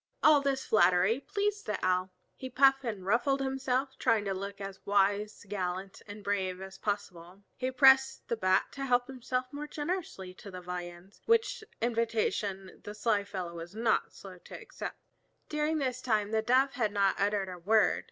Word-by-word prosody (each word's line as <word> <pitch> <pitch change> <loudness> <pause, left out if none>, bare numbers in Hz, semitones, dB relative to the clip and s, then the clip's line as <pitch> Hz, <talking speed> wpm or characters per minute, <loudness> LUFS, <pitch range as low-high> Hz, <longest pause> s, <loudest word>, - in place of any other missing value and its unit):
All 300 -2 +7
this 275 -1 -1
flattery 185 +3 +4
pleased 410 +5 -2
the 210 - -1
Owl. 185 0 +1 0.3
He 260 - -7
puffed 270 +1 +4
and 210 -6 -4
ruffled 240 +7 +2
himself, 265 0 -1
trying 225 -4 +2
to 195 - -1
look 200 +1 -6
as 195 -1 -7
wise, 205 +1 +1
gallant, 190 -1 -4
and 205 0 -9
brave 190 -2 -1
as 190 0 -9
possible. 195 -2 -5
He 255 0 -2
pressed 265 0 +5
the 235 - 0
Bat 185 -4 +2
to 275 -1 -5
help 245 -1 +2
himself 255 -1 -3
more 295 +1 -5
generously 300 - -4
to 200 - -11
the 185 -1 -7
viands, 180 +1 -8
which 455 -1 +2 0.2
invitation 220 -4 -1
the 210 - -7
sly 215 -2 +1
fellow 185 -4 -5
was 170 +3 -8
not 225 -1 +1
slow 185 -2 -12
to - - -10
accept. - - -7 0.5
During 300 +1 0
this 255 -3 -2
time 215 -4 0
the 220 0 +2
Dove 255 +4 +3
had 225 -4 0
not 200 -1 +1
uttered 200 -1 +1
a 180 -1 -7
word. 210 +2 +3
210 Hz, 175 wpm, -30 LUFS, 190-265 Hz, 0.5 s, All